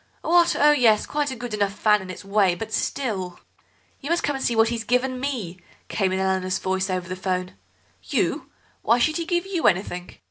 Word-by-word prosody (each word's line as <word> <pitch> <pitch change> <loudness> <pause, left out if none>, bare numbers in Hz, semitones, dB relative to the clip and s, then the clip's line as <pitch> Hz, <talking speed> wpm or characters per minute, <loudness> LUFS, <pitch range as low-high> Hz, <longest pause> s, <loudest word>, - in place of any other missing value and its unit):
What? 345 +1 +4
Oh 295 +1 +6
yes, 235 -7 +4
quite 295 -1 -1
a 260 - -4
good 240 -1 -6
enough 200 -2 0
fan 210 -1 +3
in 190 - -9
its 185 - -8
way, 195 -3 +2
but 220 +3 -7
still.. 195 -9 -2 0.3
." - - -37
"You 285 - -6
must 340 +1 +1
come 290 - 0
and 270 - -4
see 235 - +1
what 225 0 +4
he's 230 -1 -3
given 250 +2 0
me," 230 -10 -4 0.3
came 195 -3 0
in 190 - 0
Eleanor's 190 0 0
voice 190 +2 -1
over 185 -1 -2
the 185 - -4
'phone. 185 -1 -3 0.5
"You! - - -1 0.3
Why 230 +2 +3
should 310 +7 +1
he 335 -1 -4
give 345 0 0
you 375 -4 0
anything?" 180 -2 -1
215 Hz, 215 wpm, -24 LUFS, 190-265 Hz, 0.5 s, Oh